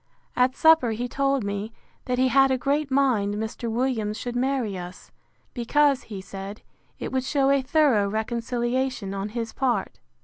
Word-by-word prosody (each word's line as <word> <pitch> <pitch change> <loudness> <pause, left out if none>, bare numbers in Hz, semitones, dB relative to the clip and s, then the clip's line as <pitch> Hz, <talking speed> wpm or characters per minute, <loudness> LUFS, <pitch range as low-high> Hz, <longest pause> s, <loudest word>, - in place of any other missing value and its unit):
At 250 +1 +2
supper 320 -8 +5
he 240 +3 -3
told 275 0 0
me, 200 +2 -3 0.3
that 250 0 -1
he 260 +1 +3
had 270 +1 +5
a 260 - +2
great 280 +3 0
mind 250 -7 +2
Mr. 220 +2 -4
Williams 225 -3 -1
should 245 -1 -5
marry 250 -5 0
us; 180 0 -9 0.4
because, 280 +3 +2
he 200 -4 -7
said, 195 +2 -8 0.3
it - - -5
would 260 -1 0
shew 275 +1 +2
a 280 -1 +3
thorough 260 -7 +3
reconciliation 235 0 -2
on 195 +1 -3
his 230 +1 -4
part. 260 -2 -1
245 Hz, 165 wpm, -25 LUFS, 215-270 Hz, 0.4 s, supper